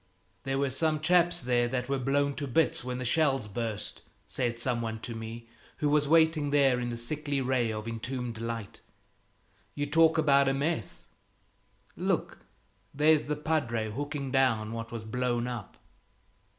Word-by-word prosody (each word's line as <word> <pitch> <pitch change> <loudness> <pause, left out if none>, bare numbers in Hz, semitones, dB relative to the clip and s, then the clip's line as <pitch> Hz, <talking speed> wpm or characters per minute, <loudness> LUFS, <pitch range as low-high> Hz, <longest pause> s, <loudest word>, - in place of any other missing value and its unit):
"There 135 0 -1
were 140 -1 0
some 155 +3 0
chaps 175 0 +3
there 120 -1 +2
that 125 0 -2
were 135 0 0
blown 140 +2 +1
to 145 - -3
bits 160 +3 +2
when 125 0 -4
the 130 - -4
shells 135 -2 +2
burst," 110 0 -4 0.2
said 120 -3 -2
some 120 0 0
one 110 -1 -4
to 120 - -5
me 115 +1 -7 0.3
who 150 - +1
was 150 0 +3
waiting 160 -1 +4
there 140 -3 +3
in 120 0 -2
the 120 - -4
sickly 145 +4 -2
ray 125 -3 +1
of 110 +1 -5
entombed 120 0 -4
light. 115 -3 -5 0.9
"You 145 - -1
talk 160 +2 +4
about 140 -3 +4
a 135 - +1
mess! 140 - -2 0.9
Look, - - -1 0.5
there's 150 +1 +3
the 150 - 0
padre 135 -8 -1
hooking 145 +2 -4
down 115 -5 +2
what 115 0 -6
was 115 -2 -5
blown 120 +1 -1
up." 120 -5 -6
130 Hz, 165 wpm, -29 LUFS, 115-145 Hz, 0.9 s, waiting